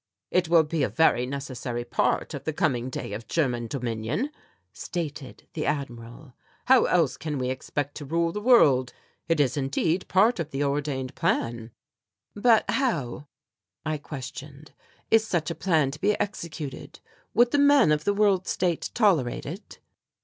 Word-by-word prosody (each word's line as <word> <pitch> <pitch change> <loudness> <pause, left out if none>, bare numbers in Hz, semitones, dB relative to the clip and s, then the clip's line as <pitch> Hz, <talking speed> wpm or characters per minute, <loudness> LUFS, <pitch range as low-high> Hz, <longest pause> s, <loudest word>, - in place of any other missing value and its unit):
"It 180 -2 +1
will 165 -1 +6
be 155 0 -2
a 130 - +1
very 125 +1 +3
necessary 130 -3 -5
part 120 - 0
of - - -6
the 155 - -2
coming 130 -6 0
day 115 - -5
of 110 +3 -7
German 125 -7 0
dominion," 125 - -3 0.4
stated 155 -6 -6
the 155 - -3
Admiral. 120 -1 -5 0.3
"How 260 -1 +6
else 165 -6 +2
can 150 -3 -4
we 130 -1 -1
expect 145 +2 -4
to 145 - -7
rule 165 +3 0
the 210 - -5
world? 140 - +5 0.3
It 165 -1 +1
is, 140 0 +2
indeed, 155 +6 0
part 205 +4 +3
of 160 -3 -3
the 140 -1 -2
ordained 140 -2 -2
plan." 115 -1 -1 0.7
"But 225 +1 +4
how," 150 - -1 0.6
I 155 -1 -1
questioned, 145 +1 -9 0.4
"is 225 -1 +5
such 170 -6 -1
a - - -1
plan 160 -7 +1
to 150 - -10
be 205 +2 +2
executed? 165 -8 -5 0.4
Would 240 +2 +5
the 290 - +2
men 285 - +5
of 150 0 +1
the 205 - +1
World 200 -3 +2
State 175 -3 -1
tolerate 180 - +2
it?" 175 +9 -8
150 Hz, 160 wpm, -26 LUFS, 130-180 Hz, 0.7 s, will